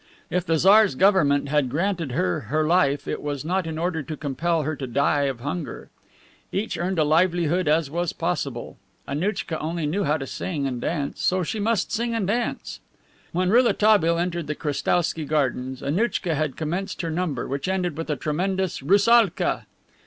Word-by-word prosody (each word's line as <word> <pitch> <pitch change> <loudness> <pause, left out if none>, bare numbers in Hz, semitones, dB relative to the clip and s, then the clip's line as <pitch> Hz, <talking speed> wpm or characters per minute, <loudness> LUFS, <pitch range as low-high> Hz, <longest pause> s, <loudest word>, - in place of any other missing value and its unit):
If 180 +1 -1
the 165 - +2
Tsar's 200 0 +5
government 145 -7 +3
had 145 -3 +2
granted 165 -1 -1
her 180 +2 0
her 155 +1 +1
life, 155 -4 +2
it - - -3
was 145 -1 -4
not 180 +1 0
in 160 -1 -4
order 165 -1 -1
to 150 +2 -6
compel 160 +3 -1
her 155 +2 -2
to 135 - -5
die 140 +3 +2
of 130 -4 -3
hunger. 145 +4 -5 0.6
Each 205 +3 -2
earned 180 +1 -2
a 155 - +4
livelihood 170 +2 +2
as 150 -1 +2
was 175 0 -1
possible. - - -3 0.3
Annouchka 165 +2 -2
only 160 +1 -2
knew 185 +7 0
how 150 -2 +1
to 135 - -5
sing 145 +1 -3
and 125 -3 -3
dance, 145 -2 -1
and - - -12
so 185 0 +1
she 215 +6 -3
must 215 -1 0
sing 235 +1 -1
and 220 -4 0
dance! 235 +5 -2 0.5
When 185 +2 +1
Rouletabille 215 -7 +4
entered 170 -2 -2
the 150 - -2
Krestowsky 160 +2 0
Gardens, 130 -3 -1
Annouchka 175 +3 0
had 155 -3 -1
commenced 175 +5 -3
her 165 - -2
number, 160 -6 -2
which 140 +3 -3
ended 180 -4 -1
with 165 +1 -5
a 150 - +1
tremendous 185 +4 -1
"Roussalka." 200 - +3
165 Hz, 180 wpm, -24 LUFS, 150-185 Hz, 0.6 s, Tsar's